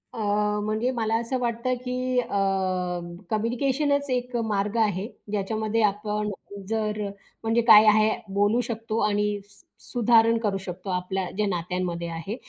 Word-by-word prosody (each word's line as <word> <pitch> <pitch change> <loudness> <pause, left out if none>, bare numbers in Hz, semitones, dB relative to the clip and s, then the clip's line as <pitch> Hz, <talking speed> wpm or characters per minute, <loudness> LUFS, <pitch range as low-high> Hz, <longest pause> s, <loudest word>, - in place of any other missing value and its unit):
अ, 230 - -6 0.4
म्हणजे 215 +4 0
मला 225 -3 0
असं 245 +2 -2
वाटतं 240 +1 -1
की 255 0 -1
अ, 245 - -1 1.0
कम्युनिकेशनच 270 +6 0
एक 250 -1 -2 0.2
मार्ग 200 +2 -1
आहे. 210 -2 +1 0.2
ज्याच्यामध्ये 215 +2 -1
आपण 210 +1 0 0.4
जर 215 -1 -1 0.4
म्हणजे 225 +1 +2
काय 215 -1 +9
आहे 215 +1 +5 0.2
बोलू 205 +4 +3
शकतो 225 -1 -3
आणि 205 0 0
स - - -20 0.2
सुधारणा 230 -1 +4
करू 205 -4 0
शकतो 180 +2 -7
आपल्या 180 0 -2
ज्या 210 - +2
नात्यांमध्ये 175 -1 -2
आहे, 165 +6 -5
215 Hz, 135 wpm, -25 LUFS, 205-235 Hz, 1.0 s, काय